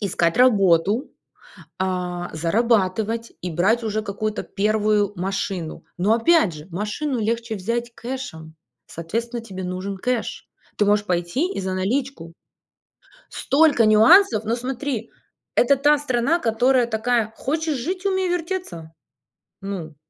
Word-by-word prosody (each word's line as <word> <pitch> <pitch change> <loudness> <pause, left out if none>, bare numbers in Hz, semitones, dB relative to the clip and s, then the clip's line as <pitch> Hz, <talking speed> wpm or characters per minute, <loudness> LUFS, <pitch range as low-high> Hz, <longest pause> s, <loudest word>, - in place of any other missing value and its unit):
искать 175 -3 0
работу, 205 - +3 0.7
а, 180 -1 -2
зарабатывать 220 +5 0
и 180 - -3
брать 200 +9 +2
уже 215 0 -1
какую-то 210 +1 -3
первую 210 0 +1
машину. 185 -2 -4
Но, 205 +5 +3
опять 235 - +3
же, 150 +1 -10
машину 215 - -3
легче 230 +1 -2
взять 235 +4 -3
кэшем. 235 - -7 0.3
Соответственно, 230 +8 -4
тебе 190 -4 -8
нужен 185 +2 -4
кэш. 250 +2 -3 0.3
Ты 205 - +3
можешь 205 0 +3
пойти 180 - -1
и - - -4
за 185 0 -3
наличку. 200 -3 -2 1.0
Столько 280 -3 +3
нюансов, 220 - +6
но 225 - 0
смотри, 250 -1 -4 0.5
это 275 +3 +4
та 290 +2 +4
страна, 280 +4 0
которая 245 +1 +2
такая: 220 -1 0
"Хочешь 310 +2 -2
жить- 365 +9 -4
умей 380 -1 +1
вертеться". 345 - -4 0.7
Ну. 180 -6 -6
220 Hz, 120 wpm, -22 LUFS, 190-255 Hz, 1.0 s, нюансов